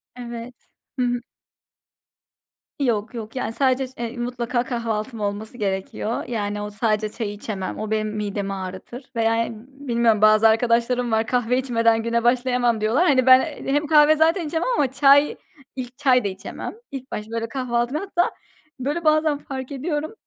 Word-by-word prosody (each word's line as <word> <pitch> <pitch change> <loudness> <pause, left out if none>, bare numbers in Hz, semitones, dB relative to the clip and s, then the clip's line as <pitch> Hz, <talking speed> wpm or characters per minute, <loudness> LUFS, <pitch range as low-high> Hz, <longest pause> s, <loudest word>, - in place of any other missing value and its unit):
Evet. 240 0 -7 0.4
Hı 250 - +3
hı. 245 0 0 1.6
Yok, 235 -5 0
yok 225 0 -7
yani 225 -3 -2
sadece 260 0 +1
ş 260 - -18
eee, 235 +1 -5
mutlaka 240 0 -1
kahvaltım 230 -2 -3
olması 210 +3 -4
gerekiyor. 200 +2 -2
Yani 210 -3 -2
o 210 - -4
sadece 215 0 0
çay 210 -3 -4
içemem. 205 -2 -5
O 215 0 -4
benim 215 0 0
midemi 205 -1 -3
ağrıtır 190 +7 -7
veya, 225 0 +2
emm, 225 +1 -9
bilmiyorum 235 -6 +1
bazı 215 +1 +6
arkadaşlarım 235 +2 +2
var, 220 0 +1
"Kahve 250 0 +1
içmeden 230 -3 +2
güne 235 0 0
başlayamam." 245 -2 +2
diyorlar. 255 +12 +2
Hani 260 -5 +4
ben, 255 0 +9
eee, 290 -3 -4
hem 295 +1 +1
kahve 305 0 +6
zaten 325 +2 +2
içemem 325 +3 -1
ama 275 - +1
çay, 280 +1 +5 0.4
ilk 255 -1 -7
çay 255 -4 +3
da 200 - 0
içemem. 190 - -6 0.2
İlk 270 -1 -7
başta 210 +1 -5
böyle 230 0 -3
kahvaltı 240 -1 -1
ve - - 0
hatta 370 -3 0 0.5
böyle 290 +6 -2
bazen 310 -1 +3
fark 270 -2 -7
ediyorum, 295 +3 -3
240 Hz, 165 wpm, -23 LUFS, 220-265 Hz, 1.6 s, ben